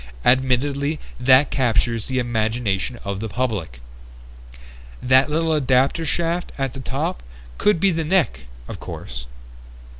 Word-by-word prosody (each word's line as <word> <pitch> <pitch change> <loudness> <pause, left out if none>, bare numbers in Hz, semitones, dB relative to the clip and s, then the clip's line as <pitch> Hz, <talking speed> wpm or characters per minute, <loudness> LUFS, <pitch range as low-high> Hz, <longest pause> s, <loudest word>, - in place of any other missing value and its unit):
Admittedly 140 +4 +2 0.2
that 130 +2 +5
captures 115 -3 +1
the 130 - -2
imagination 115 -2 -1
of 100 -1 -3
the 110 +1 -4
public. 100 - -3 1.2
That 130 +3 +4
little 160 +1 +1
adapter 135 +3 +2
shaft 170 +3 -1
at 135 -3 -2
the 135 - -8
top 90 - -3 0.4
could 210 -5 +3
be 195 +2 +3
the 165 -1 -1
neck, 150 - 0 0.2
of - - -7
course...." - - -7
130 Hz, 125 wpm, -22 LUFS, 115-150 Hz, 1.2 s, that